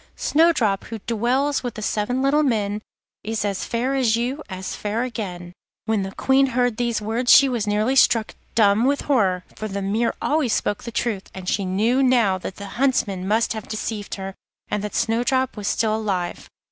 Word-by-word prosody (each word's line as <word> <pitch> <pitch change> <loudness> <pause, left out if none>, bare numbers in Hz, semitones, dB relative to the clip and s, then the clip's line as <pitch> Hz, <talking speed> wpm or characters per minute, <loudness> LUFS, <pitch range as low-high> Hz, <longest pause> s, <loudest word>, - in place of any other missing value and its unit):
Snowdrop, 290 - +2
who 225 - -6
dwells 250 +5 +1
with 245 -3 -5
the 215 - -6
seven 245 +6 -1
little 285 +3 +3
men, 215 -6 0 0.4
Is 220 0 -2
as 200 -2 -2
fair 245 +3 -1
as 250 -5 +2
you, 245 +5 -2
as 185 -1 -5
fair 215 +3 -2
again.' 180 -8 -5 0.3
When 220 -2 +1
the 195 0 -4
Queen 270 +1 +3
heard 245 -3 0
these 235 -3 -1
words 230 +4 +1
she 275 - +8
was 235 -5 -2
nearly 215 +5 +1
struck 230 -4 +4 0.2
dumb 215 +1 +4
with 280 +1 +1
horror, 195 -10 +1
for 215 - -5
the 200 -1 -4
mirror 220 +4 0
always 295 -6 +1
spoke 205 - -1
the 235 - -5
truth, 220 -4 -2
and 190 -1 -8
she 200 +1 0
knew 220 +8 +1
now 235 -8 +3
that 185 - -6
the 200 - -8 0.2
Huntsman 210 -9 +1
must 220 +2 +2
have 220 -2 -7
deceived 215 -1 -4
her, 195 0 -6 0.4
and 210 - -2
that 210 - -5
Snowdrop 245 +3 +1
was 205 -2 -5
still 220 -1 +1
alive. 195 -5 -3
225 Hz, 190 wpm, -22 LUFS, 205-250 Hz, 0.4 s, she